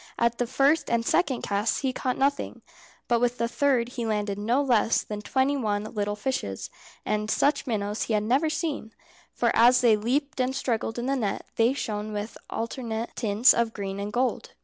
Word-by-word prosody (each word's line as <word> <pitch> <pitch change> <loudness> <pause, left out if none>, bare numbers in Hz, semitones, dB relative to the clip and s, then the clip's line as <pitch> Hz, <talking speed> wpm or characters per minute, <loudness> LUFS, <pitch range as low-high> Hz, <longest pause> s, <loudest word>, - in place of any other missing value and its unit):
At 235 0 +1
the 245 - 0
first 275 +5 +2
and 235 -1 +1
second 280 -6 +1
casts 205 +2 0
he 265 -2 0
caught 255 0 -2
nothing, 280 +1 -1 0.4
but 235 -1 +2
with 245 0 +1
the 235 - 0
third 245 -1 +1
he 245 -1 -5
landed 205 -2 -1
no 230 +6 +1
less 235 -4 +2
than 210 -1 -6
twenty 265 +7 +1
one 210 -6 -1
little 205 -1 -3
fishes, 210 - -3 0.3
and 210 0 -1
such 285 +5 +1
minnows 210 -2 -2
he 225 - -2
had 210 -1 +2
never 265 +8 +2
seen, 300 -8 -3 0.4
for - - +1
as 245 +2 +6
they 235 -3 +5
leaped 265 +7 -1
and 255 +1 0
struggled 230 -4 -2
in 240 - -3
the 275 +1 +1
net 215 -7 -2
they 230 +3 +3
shone 215 -5 -4
with 210 +2 -4
alternate 230 -1 -4
tints 220 +1 +4
of 235 -1 0
green 195 -1 -4
and 205 +1 -4
gold. 250 +3 -1
235 Hz, 195 wpm, -26 LUFS, 210-260 Hz, 0.4 s, as